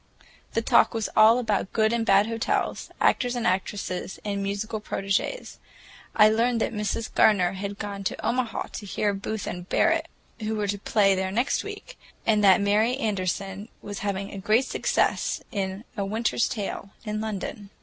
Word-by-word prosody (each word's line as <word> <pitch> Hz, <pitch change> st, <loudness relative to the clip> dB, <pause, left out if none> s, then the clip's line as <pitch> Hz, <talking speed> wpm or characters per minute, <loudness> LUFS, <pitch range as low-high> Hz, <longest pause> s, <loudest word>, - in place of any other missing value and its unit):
The 225 Hz, -, 0 dB
talk -, -, +4 dB
was 225 Hz, -2 st, -1 dB
all 220 Hz, +2 st, +7 dB
about 215 Hz, -5 st, -1 dB
good 220 Hz, 0 st, +2 dB
and 235 Hz, -1 st, +1 dB
bad 200 Hz, -2 st, +5 dB
hotels, 230 Hz, 0 st, -1 dB
actors 245 Hz, -1 st, +2 dB
and 240 Hz, -, -2 dB
actresses 185 Hz, 0 st, -2 dB
and 200 Hz, -1 st, -2 dB
musical 200 Hz, +2 st, -3 dB
prodigies. 200 Hz, -, -2 dB, 0.6 s
I 215 Hz, -1 st, +7 dB
learned 230 Hz, +2 st, +2 dB
that 230 Hz, -, -1 dB
Mrs. 210 Hz, +1 st, -2 dB
Gardener 185 Hz, -5 st, +4 dB
had 200 Hz, +1 st, -5 dB
gone 200 Hz, -1 st, -5 dB
to -, -, -3 dB
Omaha 235 Hz, 0 st, -1 dB
to 205 Hz, -, -7 dB
hear 205 Hz, +1 st, 0 dB
Booth 200 Hz, +1 st, -4 dB
and 180 Hz, +1 st, -6 dB
Barrett, -, -, +2 dB, 0.3 s
who 220 Hz, 0 st, -2 dB
were 210 Hz, -1 st, -1 dB
to 200 Hz, 0 st, -2 dB
play 200 Hz, -1 st, +3 dB
there 190 Hz, 0 st, -1 dB
next 240 Hz, +6 st, 0 dB
week, -, -, -9 dB, 0.3 s
and 215 Hz, -2 st, +3 dB
that 190 Hz, -2 st, +7 dB
Mary 215 Hz, +5 st, +2 dB
Anderson 195 Hz, -2 st, -2 dB
was 205 Hz, -1 st, -6 dB
having 200 Hz, 0 st, -3 dB
a 195 Hz, -, -6 dB
great 215 Hz, +6 st, +3 dB
success -, -, 0 dB
in 195 Hz, -1 st, -3 dB
"A 200 Hz, -, -1 dB
Winter's 220 Hz, +4 st, 0 dB
Tale," 200 Hz, -2 st, -4 dB, 0.2 s
in 215 Hz, 0 st, -2 dB
London. 205 Hz, -1 st, -5 dB
210 Hz, 170 wpm, -26 LUFS, 195-225 Hz, 0.6 s, all